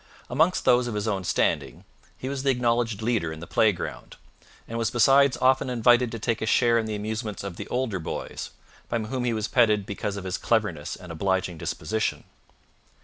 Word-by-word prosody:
Amongst 160 +8 +2
those 120 0 +4
of 115 - -4
his 105 +1 -2
own 100 -3 -1
standing 90 - 0 0.3
he 130 - -6
was 135 0 -3
the 135 - +1
acknowledged 120 -4 +1
leader 110 -9 0
in 80 - -7
the 85 - -7
playground, 100 +2 0 0.5
and 115 0 -4
was 115 -2 +1
besides 135 +3 +4
often 130 0 +3
invited 120 0 +4
to 115 - -4
take 115 0 -1
a 110 - -1
share 115 0 +4
in 110 - -2
the 110 - -3
amusements 110 -1 -4
of 100 -3 -5
the - - -7
older 125 -6 -1
boys, 80 - -5 0.4
by - - 0
whom 125 +3 -3
he 120 - +1
was 110 -1 -2
petted 110 -5 +3
because 100 0 -4
of 100 - -6
his 95 -1 -3
cleverness 105 -10 0
and 90 -2 -11
obliging 95 0 -1
disposition. 110 +6 -2
110 Hz, 195 wpm, -26 LUFS, 100-120 Hz, 0.5 s, those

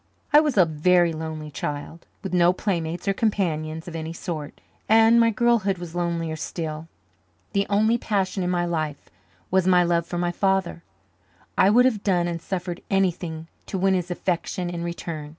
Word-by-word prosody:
I 295 - +9
was 300 -6 0
a 185 - +7
very 170 +2 +3
lonely 155 -1 -6
child, 145 +3 -6 0.2
with 190 -2 -5
no 175 0 +4
playmates 175 -2 -3
or 195 - +3
companions 160 -7 -1
of 170 - -7
any 160 0 -4
sort, 160 -3 -6 0.3
and 225 +1 +6
my 230 0 +5
girlhood 225 -4 +2
was 170 -2 -8
lonelier 170 -2 -2
still. 155 0 -5 0.7
The 200 0 +1
only 220 +3 +3
passion 195 -3 -1
in 180 - -1
my 175 -1 +1
life 155 -4 -3 0.4
was 190 0 +2
my 180 -1 +5
love 170 -1 +1
for 175 - -4
my 175 0 0
father. 190 -2 0 0.7
I 190 - +5
would 245 +4 +5
have 225 -6 +1
done 175 -3 +2
and 170 -1 -4
suffered 180 -1 -4
anything 175 -4 -1 0.2
to 195 - -3
win 190 +1 +2
his 180 -1 -1
affection 175 0 -2
in 170 -1 -4
return. 165 -3 -5
175 Hz, 175 wpm, -24 LUFS, 165-195 Hz, 0.7 s, I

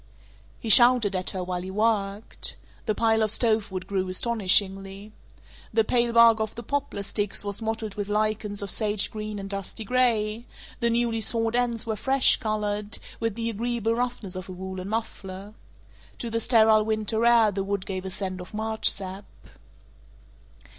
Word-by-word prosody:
He 225 - -5
shouted 240 -3 +7
at 185 0 0
her 185 -1 -4
while 180 0 -3
he 185 - -7
worked. 205 0 -1 0.3
The 215 - +1
pile 225 0 +2
of 215 - +2
stove 220 -2 +1
wood 185 -1 -5
grew 190 -1 -2
astonishingly. 195 -1 +1 0.6
The 225 0 +3
pale 235 +2 +1
bark 230 -1 +6
of 220 -1 -3
the 235 - -7
poplar 285 -8 -3
sticks 205 +1 -1
was 205 +1 -1
mottled 220 -1 -3
with 205 0 -5
lichens 210 -1 -1
of 200 - -4
sage 210 -2 +1
green 215 -1 -5
and 195 -1 -6
dusty 200 +3 -5
gray; 230 -1 +1 0.3
the 235 -1 +1
newly 230 -1 0
sawed 225 +1 0
ends 240 -2 0
were 220 -1 -2
fresh 265 +5 +4
colored, 210 -1 -2 0.2
with 225 -3 -2
the 230 0 -2
agreeable 230 0 -1
roughness 235 -5 -3
of 185 0 -7
a - - -6
woolen 190 +1 -6
muffler. 205 -2 -5 0.6
To 235 - -5
the 230 - 0
sterile 220 -2 +4
winter 220 +1 -1
air 235 -3 +5
the 195 0 -3
wood 200 -1 -3
gave 185 -1 -4
a 190 - -5
scent 185 -1 -5
of 180 - -10
March 220 0 +2
sap. 190 +1 -3
215 Hz, 170 wpm, -25 LUFS, 195-230 Hz, 0.6 s, shouted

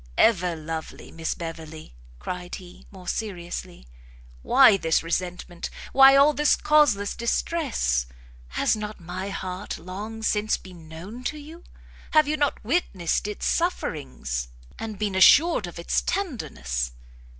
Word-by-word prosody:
"Ever 180 -6 +3
lovely 160 0 -7
Miss 165 0 -3
Beverley," 160 - -8 0.2
cried 180 - -5
he, 180 -1 -13
more 185 -3 -13
seriously, 175 - -5 0.5
"why 195 - +6
this 165 -4 +1
resentment? 175 +1 -3 0.2
why 270 0 +8
all 285 +2 +6
this 295 0 +3
causeless 265 -10 +3
distress? 235 - 0 0.4
Has 65 - +1
not 210 0 -6
my 180 +3 -5
heart 185 0 -5
long 210 +5 -7
since 215 0 +1
been 175 -4 -13
known 185 +10 -9
to 305 - -2
you? 315 +4 -11 0.5
have 310 -1 +6
you 305 - +1
not 290 -6 -1
witnessed 205 - 0
its 210 - -4
sufferings, 65 - -2 0.3
and 220 -2 -5
been 210 -1 -1
assured 255 - +6
of 175 - -10
its 170 - 0
tenderness? 135 - -3
190 Hz, 130 wpm, -25 LUFS, 165-240 Hz, 0.5 s, why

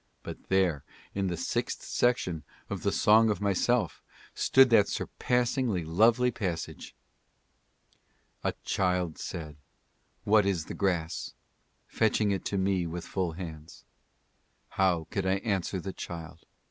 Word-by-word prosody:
But - - -9
there, 95 -7 +2 0.3
in 100 -1 -1
the' 90 -2 -2
sixth - - -2
section 95 -10 0 0.3
of - - -3
the - - +1
Song 110 +1 +5
of 105 -4 0
Myself, 105 +4 +1 0.3
stood 130 -1 +5
that 105 -3 +6
surpassingly 125 - 0
lovely 115 +9 +4
passage: 95 -8 -5 1.5
"A - - 0
child 90 -3 0
said, 75 -3 -6 0.7
What 105 0 +5
is 90 -5 0
the - - -6
grass? 85 -5 -2 0.5
fetching 110 -2 +1
it 95 - -2
to 100 - -1
me 95 -2 +1
with 85 +1 -5
full 90 -4 -2
hands; 80 -2 -9 0.8
How 90 -4 +1
could 100 -2 -1
I 95 - +3
answer 100 -2 -1
the 95 +2 -5
child 85 -1 -8
95 Hz, 130 wpm, -29 LUFS, 85-105 Hz, 1.5 s, that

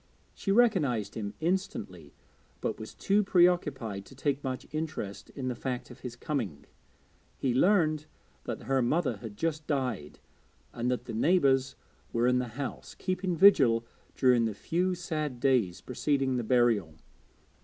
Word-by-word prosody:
She 195 - -2
recognised 155 - +3
him 105 -2 -5
instantly, 160 - -3 0.4
but - - -3
was 110 - -8
too 205 +2 +2
pre 180 -3 +5
occupied 135 - -1
to 135 - -14
take 140 +1 -1
much 130 -2 -3
interest 155 -10 -4
in 130 -3 -4
the 125 - 0
fact 125 0 -4
of - - -12
his 125 -2 -7
coming. 120 - -3 0.7
He 130 -3 0
learned 155 -1 +3 0.4
that - - -4
her 135 +2 +1
mother 130 -1 +1
had 105 -1 -9
just 155 -2 -2
died, 125 - -2 0.6
and 120 +1 -1
that 125 -1 -1
the 115 - -6
neighbours 135 0 +3 0.4
were 115 +1 +1
in 125 0 +3
the 125 - -2
house, 140 -2 -5
keeping 185 -1 -2
vigil 135 -11 +6 0.3
during 125 -3 +4
the 110 -3 -2
few 180 - 0
sad 155 -7 -3
days 120 -9 +2
preceding 135 0 0
the 120 - -1
burial. 110 -9 +2
130 Hz, 155 wpm, -29 LUFS, 115-160 Hz, 0.7 s, vigil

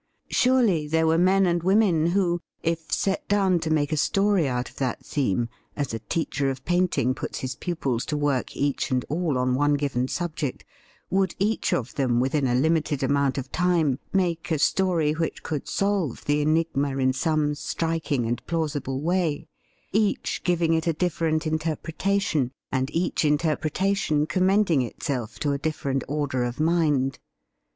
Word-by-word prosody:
Surely 235 -12 +3
there 160 +1 +2
were 160 +1 +3
men 190 +2 +4
and 175 -1 +1
women 185 -3 +3
who, 175 -1 +1 0.2
if 165 -1 -2
set 195 -1 0
down 195 -3 +3
to 160 - -3
make 150 -2 +1
a 155 - 0
story 195 +1 +2
out 125 -1 -2
of - - -15
that 130 -3 -2
theme, 120 -5 0 0.3
as 140 -5 -3
a 115 - -3
teacher 140 +3 -1
of 135 0 -5
painting 175 -8 +1
puts 130 - -5
his 130 0 -3
pupils 135 -7 -2
to 150 - -2
work 145 -3 -1
each 140 -1 0
and 125 -1 0
all 155 -2 0
on 125 0 +1
one 145 +2 +2
given 135 -3 -1
subject, 155 -4 -3 0.5
would 190 -1 +1
each 210 +3 0
of 125 0 -1
them 125 -4 +1
within 135 +2 +1
a 120 - +1
limited 150 0 +1
amount 140 0 +1
of 135 0 -5
time 170 -7 +1
make 175 -4 0
a 160 - +1
story 170 -1 +2
which 160 +1 -3
could 150 -3 -4
solve 195 - -1
the 145 0 +2
enigma 150 -3 +1
in 130 -1 +2
some 150 +1 +1
striking 155 -4 -2
and 120 +1 -2
plausible 145 -5 -2
way 170 -2 0 0.2
— - - -39 0.2
each 210 0 0
giving 170 -2 +2
it 160 +1 0
a 165 - +3
different 160 -1 0
interpretation, 160 -1 -1 0.2
and 130 0 0
each 165 +3 0
interpretation 155 +2 +1
commending 185 -1 +2
itself 125 -1 -4
to 145 - 0
a 140 - -1
different 140 -3 -2
order 140 -3 -1
of 120 +2 -4
mind. 150 -5 +1
155 Hz, 165 wpm, -25 LUFS, 135-175 Hz, 0.5 s, men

